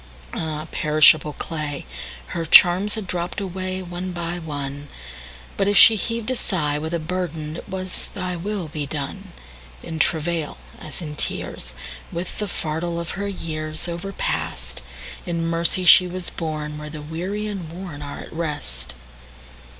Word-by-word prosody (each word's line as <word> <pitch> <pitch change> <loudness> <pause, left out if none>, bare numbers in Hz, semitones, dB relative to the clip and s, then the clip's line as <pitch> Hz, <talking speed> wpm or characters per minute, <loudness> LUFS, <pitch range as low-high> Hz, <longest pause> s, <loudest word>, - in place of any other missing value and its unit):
Ah, 155 -1 -3
perishable 155 -1 +6
clay! 150 -3 -3 0.4
Her 170 - -2
charms 180 +6 +7
had 215 -2 -3
dropp'd 175 -1 -3
awayOne 185 -1 -3
by 175 0 -2
one; 145 -3 -5 0.7
But 195 - +2
if 205 0 +4
she 225 - +11
heav'd 230 +2 -1
a - - +3
sighWith 155 -9 0
a - - +3
burden, 160 -2 -3
it - - -9
was, 185 -1 -3
"ThyWill 185 -1 -3
be 150 -3 -2
done."In 65 - -7
travail, 160 0 +1 0.2
as 155 +3 -5
in 150 -2 -5
tears, 65 - -4 0.4
With 170 +1 -3
the 210 - 0
fardel 170 0 -1
of 170 - -3
her 200 +1 -2
yearsOverpast, 155 - -3 0.5
In 170 -1 0
mercy 170 +2 +1
she 180 +1 +9
was 180 0 -5
borneWhere 150 -2 -4
the 150 -1 -7
weary 180 +7 -3
and 195 -6 -4
wornAre 155 -5 -6
at - - -11
rest. 65 - -3
165 Hz, 135 wpm, -23 LUFS, 150-185 Hz, 0.7 s, she